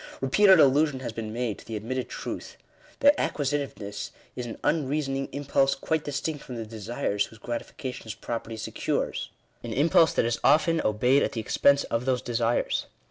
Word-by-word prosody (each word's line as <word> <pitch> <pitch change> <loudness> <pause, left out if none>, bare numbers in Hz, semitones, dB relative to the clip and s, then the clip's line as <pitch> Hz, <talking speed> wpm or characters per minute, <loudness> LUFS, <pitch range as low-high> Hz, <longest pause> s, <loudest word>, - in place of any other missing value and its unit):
Bepeated 190 +7 +5
allusion 140 -1 +4
has 120 -3 -4
been 110 -1 -5
made 115 -2 -2
to - - -14
the 115 - -4
admitted 125 +4 -3
truth, - - -6 0.4
that 285 +1 +7
acquisitiveness 135 -9 -2 0.3
is 125 -1 -4
an 115 - -7
unreasoning 135 -2 0
impulse 135 -1 +1
quite 160 -1 -1
dis 145 -1 -2
tinct 150 0 -3
from 125 - -8
the 115 -1 -4
desires 110 -1 -2
whose 115 - -15
gratifications 120 -1 -6
property 115 -1 -5
secures 110 - -2 0.2
— - - -38
an 115 -1 -4
impulse 160 +4 +4
that - - +2
is 120 0 0
often 155 +3 +4
obeyed 125 +6 +3
at - - 0
the 115 - -3
expense 140 +5 +3
of 115 +2 -2
those 130 -2 0
desires. 120 0 0
130 Hz, 175 wpm, -27 LUFS, 115-145 Hz, 0.4 s, that